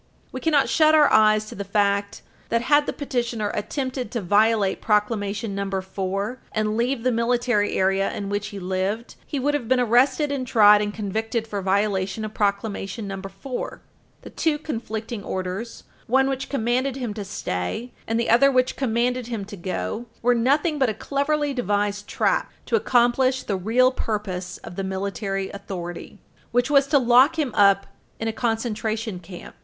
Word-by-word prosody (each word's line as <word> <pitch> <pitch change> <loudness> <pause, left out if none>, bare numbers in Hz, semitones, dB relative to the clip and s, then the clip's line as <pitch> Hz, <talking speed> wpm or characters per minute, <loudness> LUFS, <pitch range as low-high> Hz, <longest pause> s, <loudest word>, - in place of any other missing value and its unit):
We 260 - -5
cannot 300 -4 +3
shut 310 0 +4
our 300 -2 +5
eyes 215 0 +5
to - - -9
the 200 - -5
fact 200 0 0 0.3
that, 230 0 +1
had 290 +3 +3
the - - 0
petitioner 235 -6 -2
attempted 255 +2 -3
to 235 - -3
violate 205 +1 +2
Proclamation 210 -1 0
No. 200 0 -3
4 195 +5 -3
and 215 0 0
leave 240 +1 0
the 255 - +2
military 235 -2 +1
area 195 +1 +2
in 200 - -5
which 205 +1 -2
he 205 -2 -8
lived, 190 +5 -2
he 285 - -3
would 290 +3 +1
have 275 -6 -2
been 260 +1 +3
arrested 260 +5 +3
and 265 -3 -2
tried 210 -2 +6
and 205 0 -1
convicted 220 +2 -2
for 205 -3 -4
violation 195 +1 0
of 215 - -7
Proclamation 200 0 -2
No. 195 -1 -5
4. 195 +7 -6 0.4
The - - -10
two 315 -2 0
conflicting 225 -6 -5
orders, 190 +5 -5 0.2
one 265 +3 +3
which 270 0 -3
commanded 255 +1 0
him 245 -5 -4
to 205 -1 -5
stay 190 - -4 0.2
and 225 +1 0
the 235 - +1
other 275 +4 +6
which 255 -1 +2
commanded 245 -1 0
him 225 -5 -4
to 205 - -9
go, 200 +5 -4 0.2
were 245 +1 +4
nothing 290 +6 +1
but 265 -3 +3
a 215 - -3
cleverly 285 +4 -1
devised 205 -3 -1
trap - - 0
to - - +1
accomplish 255 - +2
the 200 - -2
real 230 +7 +3
purpose 195 -7 -4
of 175 - -9
the 195 - -2
military 195 0 -3
authority, 180 -3 -7 0.3
which 245 +3 +1
was 280 -1 +5
to 285 - +4
lock 255 +5 +5
him 285 -7 -1
up 200 -1 +4 0.3
in 225 - -2
a 225 - -1
concentration 220 -3 -2
camp. 175 0 -11
220 Hz, 175 wpm, -23 LUFS, 200-255 Hz, 0.4 s, tried